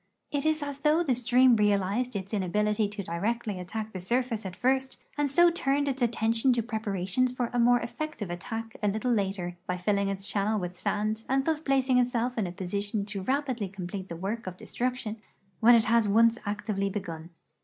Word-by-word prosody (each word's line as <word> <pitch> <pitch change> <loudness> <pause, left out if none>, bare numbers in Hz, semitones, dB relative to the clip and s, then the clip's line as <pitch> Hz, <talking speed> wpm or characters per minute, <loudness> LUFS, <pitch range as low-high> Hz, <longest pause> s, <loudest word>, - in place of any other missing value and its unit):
It 285 +1 0
is 310 -1 +1
as 285 -1 -5
though 305 +3 +3
the 275 -6 +2
stream 250 +1 +4
realized 210 +3 +1
its 195 +1 -5
in 205 - +1
ability 210 +3 +1
to 205 -1 -5
directly 205 +4 -2
attack 215 +4 -5
the 185 - -5
surface 235 0 -1
at 185 - -8
first 265 +3 0 0.2
and 290 -1 0
so 345 +5 +5
turned 285 -3 0
its 270 -1 -2
attention 230 +1 +2
to 235 -1 0
j^reparations 220 +2 -1
for 245 -2 -2
a 245 - +1
more 245 +1 +5
effective 235 - -5
attack 225 +6 -5
a 210 - +1
little 220 +5 0
later 190 -5 -1
by 180 - -1
filling 200 +2 +1
its 195 0 -4
channel 210 +1 0
with 180 -1 -5
sand 215 +4 -1
and 270 +1 +2
thus 320 -2 +1
placing 265 -4 +2
itself 245 0 0
in 215 -5 0
a - - -5
posi 190 +2 -3
tion 205 0 -2
to 200 -1 -5
rapidly 260 -2 -1
complete 190 0 -6
the 170 - -5
work 195 +5 -4
of 180 -1 -5
destruction 245 -2 -3 0.4
when 240 +1 +7
it 230 - +5
has 230 -1 +3
once 230 +3 +4
actively 205 -1 -1
begun. 170 -5 -6
220 Hz, 200 wpm, -28 LUFS, 195-250 Hz, 0.4 s, when